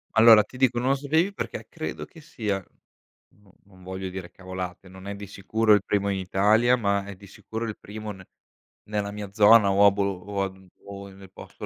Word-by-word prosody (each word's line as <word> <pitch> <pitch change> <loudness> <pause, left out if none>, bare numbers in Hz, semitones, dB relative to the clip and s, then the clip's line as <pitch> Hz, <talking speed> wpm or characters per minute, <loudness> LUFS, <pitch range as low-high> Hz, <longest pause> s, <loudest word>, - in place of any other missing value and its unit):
Allora 110 -1 +8
ti 120 +5 -14
dico 125 -2 +2
non 125 +2 0
lo 135 - +3
sapevi 160 +8 0
perché - - -6
credo 155 -2 -6
che 165 - -16
sia 105 - -3 0.7
non 105 -1 -25
non 95 -2 -19
voglio 95 +1 -5
dire 90 -1 -8
cavolate, 95 0 -7
non 95 +1 -13
è 100 - -4
di 100 0 -9
sicuro 110 +3 +1
il 105 -2 +3
primo 100 -1 0
in 100 - -1
Italia, 105 +6 +3
ma 100 -3 0
è 100 -1 -8
di 100 +2 -15
sicuro 110 +4 -6
il 110 - -6
primo 105 +1 -8
ne 95 -2 -12 0.6
nella 105 -1 -2
mia 105 -1 -7
zona 105 0 +6
o 100 +1 +5
a 100 - +7
bolo 100 0 0
o 100 +1 -4
a 95 - -2
mhmm, 95 0 -18 0.2
o 100 0 -9
nel 95 0 -14
posto - - -10
100 Hz, 215 wpm, -25 LUFS, 95-110 Hz, 0.7 s, Allora